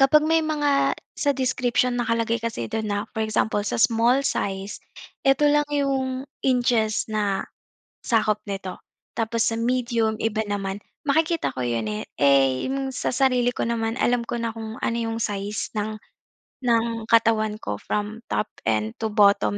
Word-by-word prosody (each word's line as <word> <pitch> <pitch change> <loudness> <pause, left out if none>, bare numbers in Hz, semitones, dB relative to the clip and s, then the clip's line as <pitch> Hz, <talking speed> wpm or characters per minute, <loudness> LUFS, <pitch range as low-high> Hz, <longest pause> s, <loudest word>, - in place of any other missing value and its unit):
kapag 300 +3 +6
may 325 +1 +3
mga, 295 -3 +2 0.2
sa 285 - +2
description 250 -1 +1
nakalagay 230 0 0
kasi 220 - -3
do'n 220 -1 -2
na, 205 0 0
for 220 - -3
example, 215 -1 +1
sa - - -1
small 230 +5 +3
size, 195 +1 -2 0.5
ito 270 +2 +4
lang 295 0 +3
'yong, 270 -2 0 0.2
inches 240 -4 +2
na, 205 -2 0 0.6
sakop 215 -2 +2
nito. 190 -2 -4 0.4
Tapos 225 0 +1
sa 225 - 0
medium, 230 -2 0
iba 220 -1 0
naman, 200 0 -3 0.3
makikita 320 +3 +1
ko 130 - -3
'yon 115 -2 -1
eh, 105 0 -3 0.2
eh, 135 -2 +4
'yong 270 0 -2
sa 255 - -2
sarili 250 -2 +3
ko - - -2
naman, 225 -1 -1
alam 240 -1 +2
ko 240 - -3
na 230 - -1
kung 220 -1 -7
ano 235 - 0
'yong 225 0 -2
size 205 0 -2
ng 215 +1 -2 0.6
ng 230 -2 0
katawan 220 -2 +3
ko, 105 0 -3
from 210 +2 -3
top - - 0 0.2
end 110 0 0
to 220 - 0
bottom 205 -1 +4
225 Hz, 160 wpm, -24 LUFS, 210-250 Hz, 0.6 s, kapag